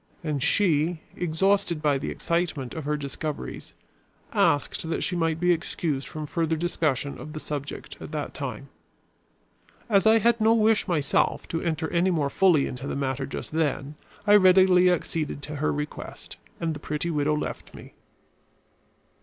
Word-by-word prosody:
And 150 -4 -2
she, 165 -1 +2 0.2
exhausted 180 +1 +1
by 145 -3 +1
the 135 - -4
excitement 170 -7 -2
of 160 -3 -6
her 150 0 0
discoveries, 145 +1 -5 0.6
asked 145 +2 +1
that 165 - -1
she 180 - -1
might 165 -2 0
be 180 +1 +3
excused 155 -4 -2
from 155 -1 -6
further 165 +1 0
discussion 155 -4 -1
of 155 - -8
the 155 - -5
subject 145 -2 -6
at - - -8
that - - -4
time. - - -6 1.2
As 205 -2 +3
I 220 +1 +7
had 230 +1 +2
no 225 +1 +5
wish, 220 -1 +3
myself, 155 -6 +1
to 165 - -2
enter 160 -1 -1
any 175 +2 +3
more 150 -6 0
fully 170 -6 +4
into 130 +2 -6
the - - -3
matter 135 -1 -2
just - - -6
then, 150 -2 -1 0.3
I 205 0 +7
readily 185 -1 +6
acceded 160 -4 -2
to 150 +1 -5
her 150 +2 +1
request, 150 +1 -6 0.2
and 165 -1 -1
the 145 - -7
pretty 150 +3 -3
widow 150 0 +1
left - - -5
me. - - -12
160 Hz, 160 wpm, -26 LUFS, 145-180 Hz, 1.2 s, I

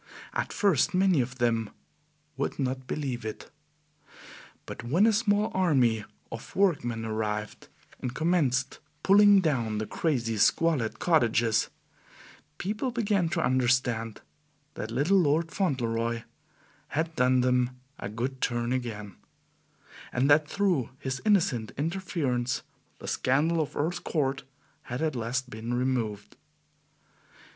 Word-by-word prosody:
At - - -2
first, 195 - +2
many 185 -6 +4
of 125 +1 -4
them 115 -3 +1 0.7
would 140 - -2
not 130 -1 -2
believe 130 -5 -3
it; 110 -1 -7 1.1
but - - -7
when 160 - +3
a 225 - +4
small 210 -1 +2
army 130 - +2 0.3
of 115 - -8
workmen 120 - +1
arrived 105 -1 -3 0.3
and 125 - -3
commenced 140 -6 +1 0.2
pulling 200 0 +7
down 120 -10 0
the 110 - -2
crazy, 120 -6 -1
squalid 140 0 +2
cottages, 120 -8 +2 0.9
people 215 +7 -2
began 205 -7 +1
to 165 -2 0
understand 125 -3 +1 0.5
that 110 - -5
little 145 +12 +3
Lord 160 0 +2
Fauntleroy 115 - -1 0.6
had 160 +2 -2
done 125 0 +3
them 125 0 +1 0.2
a 100 - -4
good 125 +5 -4
turn 120 0 0
again, 105 -6 -4 0.9
and 125 +2 +1
that 150 +1 +5
through 185 - +1
his 130 0 -4
innocent 160 - +2
interference 145 -7 -1 0.3
the - - -10
scandal 155 +6 +2
of 150 - -4
Earl's 170 +4 -1
Court 140 -4 -1 0.4
had 130 +2 -4
at 155 -3 0
last 125 +2 -2
been 115 +3 -4
removed. 120 -5 -2
130 Hz, 120 wpm, -28 LUFS, 120-165 Hz, 1.1 s, pulling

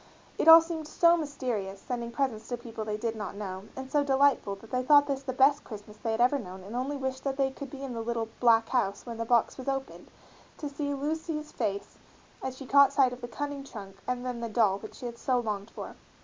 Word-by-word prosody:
It - - +1
all 325 0 +12
seemed 325 -2 -5
so 335 +2 +5
mysterious, 250 - -3
sending 240 0 -4
presents 235 -4 -2
to 245 - -3
people 230 -2 -7
they 210 -1 -3
did 230 +1 -2
not 205 -3 -5
know, 195 -1 -6
and 265 0 -7
so 295 -1 +3
delightful, 270 -7 +3
that 220 +3 -16
they 255 - +1
thought 285 +2 +6
this 275 -2 -2
the 270 -1 -4
best 275 +3 +4
Christmas 210 -1 -10
they 230 - -4
had 220 - -1
ever 255 +4 +4
known 185 -4 -9
and 205 +5 -8
only 270 +3 -2
wished 265 -1 -3
that 275 -1 -2
they 270 -1 +2
could 275 +1 -8
be 275 0 -8
in 265 -2 -4
the 230 - -3
little 230 -1 -2
"black 230 -2 +4
house" 215 -6 0
when 235 -2 -6
the 230 - -1
box 235 +2 +2
was 260 - -7
opened, 270 0 -4 0.5
to 295 - -4
see 285 0 -3
Lucy's 305 +1 -3
face 200 -3 -3 0.4
as 260 -1 -4
she 270 - -8
caught 280 +1 +6
sight 265 -3 +3
of 250 - -10
the 240 - -5
cunning 285 +2 -4
trunk 200 -7 -10
and 250 0 -2
then 250 -2 -3
the 230 -1 -4
doll 210 -3 +2
which - - -10
she - - -9
had 235 -1 -6
so 255 -2 +1
longed 210 -2 -3
for. - - -8
250 Hz, 245 wpm, -29 LUFS, 225-280 Hz, 0.5 s, all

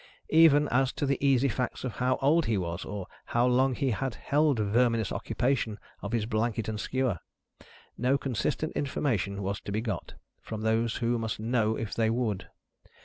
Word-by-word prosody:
Even, 155 -2 +6
as 130 +1 +2
to - - -2
the 140 0 -1
easy 135 -1 +4
facts 125 -1 -2
of 125 -4 -4
how 130 +1 +2
old 160 +4 +4
he 110 -2 +1
was, 85 -1 -3
or 100 -2 -5 0.2
how 120 +1 +2
long 130 +1 +3
he 135 -1 0
had 130 +2 -2
held 145 -2 +2
verminous 110 +1 +2
occupation 120 -4 -1 0.2
of 100 - -5
his 115 -3 0
blanket 110 0 -1
and 110 -1 -3
skewer, 125 -5 -1 0.8
no 130 +3 +3
consistent 140 +4 -2
information 105 -8 -1
was 100 +1 -2
to - - -6
be 105 - 0
got, 110 -6 -4 0.3
from 110 -1 -6
those 110 +1 +1
who 120 0 0
must 110 -2 -3
know 110 -1 +1
if 110 -5 -4
they 110 -1 +1
would. 115 -4 -1
120 Hz, 180 wpm, -29 LUFS, 110-135 Hz, 0.8 s, Even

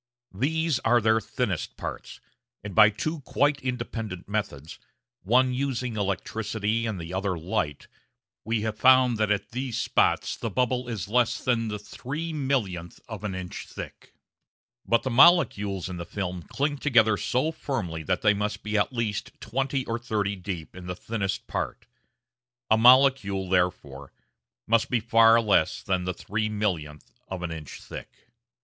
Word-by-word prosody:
These 155 - 0
are 120 +1 +3
their 110 0 +3
thinnest - - -3
parts, - - -7 0.4
and 100 -2 -6
by 105 0 +8
two 155 +10 -3
quite 145 +1 +1
independent 115 -7 -4
methods 100 -8 -4 0.4
one 125 +6 +3
using 125 -3 -2
electricity 110 +2 -1
and 105 -4 -3
the 85 +2 -7
other 95 -1 -1
light 75 -3 -2 0.6
we 110 0 -1
have 110 0 -3
found 130 -3 +5
that 110 -1 +2
at 100 -1 -1
these 125 -1 -3
spots - - +1
the 115 - -4
bubble 125 +3 0
is 105 -6 -4
less 120 +1 +2
than 120 -3 +1
the 105 -1 -3
three 150 +10 -6
millionth 110 - -2
of - - -7
an 100 -3 -3
inch 90 -1 -6
thick! - - -10 0.7
But 115 - +3
the 130 - -2
molecules 115 - +4
in 90 -1 -6
the 85 - -4
film 90 -2 -4
cling 145 0 -1
together 110 -7 +4
so 130 +9 0
firmly 105 - -4
that 90 +3 -1
they 105 - +5
must 105 +1 -3
be 105 0 0
at 100 - +1
least 115 -5 -3
twenty 135 +3 -2
or 115 +1 -2
thirty 105 -4 -1
deep 90 -4 -6
in 90 -1 -9
the 90 - -3
thinnest 100 -1 -3
part. - - -4 0.9
A - - +8
molecule, 120 -6 +5
therefore, 80 -7 -1 0.5
must 115 0 +2
be 125 - +2
far 115 0 +5
less 105 -8 +2
than 90 -2 -1
the 90 - -1
three 105 +3 -2
millionth 90 -9 -3
of 95 -2 -5
an 85 - -3
inch 80 -3 -8
thick. - - -8
110 Hz, 160 wpm, -26 LUFS, 95-125 Hz, 0.9 s, by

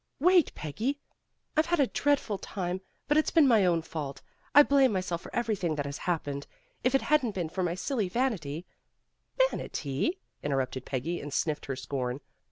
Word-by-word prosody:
"Wait, 360 +2 +5
Peggy! 220 - -2 0.6
I've 310 +1 +3
had 345 -1 +1
a 280 - +6
dreadful 265 -7 0
time, 185 -1 -3 0.3
but 295 - +3
it's 310 - +3
been 315 -4 +5
my 220 -6 +5
own 170 -2 +2
fault. 150 -4 -6 0.3
I 290 - +11
blame 275 -3 +4
myself 185 -3 -2
for - - -10
everything 205 -9 0
that 145 -1 -2
has 140 0 -5
happened. 145 -4 -2 0.4
If 255 +1 +3
it 270 - +3
hadn't 270 -8 +2
been 175 -4 -2
for 185 - -3
my 175 -1 0
silly 205 +1 -1
vanity 180 - -1 0.4
" - - -6
"Vanity" 145 - -2 0.2
interrupted 135 -2 -1
Peggy, 145 +6 -2
and 145 - -6
sniffed 150 +1 -1
her 135 - -2
scorn. 130 -1 -3
185 Hz, 175 wpm, -29 LUFS, -, 0.6 s, I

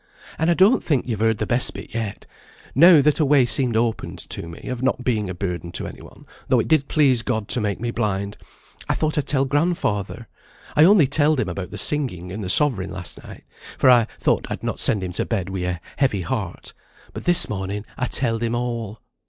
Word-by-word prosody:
"And 160 +2 +2
I 170 - +4
don't 195 +8 +4
think 140 -6 0
you've 110 -4 -2
heard 110 0 +2
the 105 - -2
best 120 +3 +1
bit - - -9
yet. 110 -3 -4 0.5
Now 165 +2 +7
that 150 +2 +2
a - - +4
way 140 -3 +4
seemed 120 0 +1
opened 115 -1 -1
to - - -4
me, 85 - -10
of 125 -1 -5
not 130 -1 0
being 110 -6 0
a 90 - -5
burden 90 -2 -4
to - - -4
any - - -9
one, - - -15 0.2
though - - +3
it - - -1
did 155 -3 +2
please 135 -6 +3
God 110 -4 -2
to 125 - -1
make 105 -2 -2
me 120 0 -2
blind, 100 -3 -2 0.5
I - - +2
thought 155 -1 -1
I'd 150 - -1
tell 135 -2 +1
grandfather. 145 - -1 0.5
I 150 - +7
only 190 -4 +6
telled 145 +1 +2
him 105 - -1
about 90 +1 -5
the - - -8
singing 105 - -2
and 105 +2 -5
the 90 - -4
sovereign 100 -6 +1
last 90 -3 -7
night, - - -12 0.3
for 130 - +5
I 120 -2 +5
thought - - +1
I'd - - -5
not - - -3
send 100 -3 +2
him 90 - -4
to 90 - -1
bed 95 -5 -2
wi' 95 -2 -3
a 90 -1 -3 0.2
heavy 130 -9 +1
heart; 95 -3 -5 0.4
but - - -8
this 175 -1 +3
morning 100 +1 -4
I 125 - -2
telled 115 -3 -1
him 115 0 -1
all." 115 -3 -4
120 Hz, 225 wpm, -22 LUFS, 100-140 Hz, 0.5 s, Now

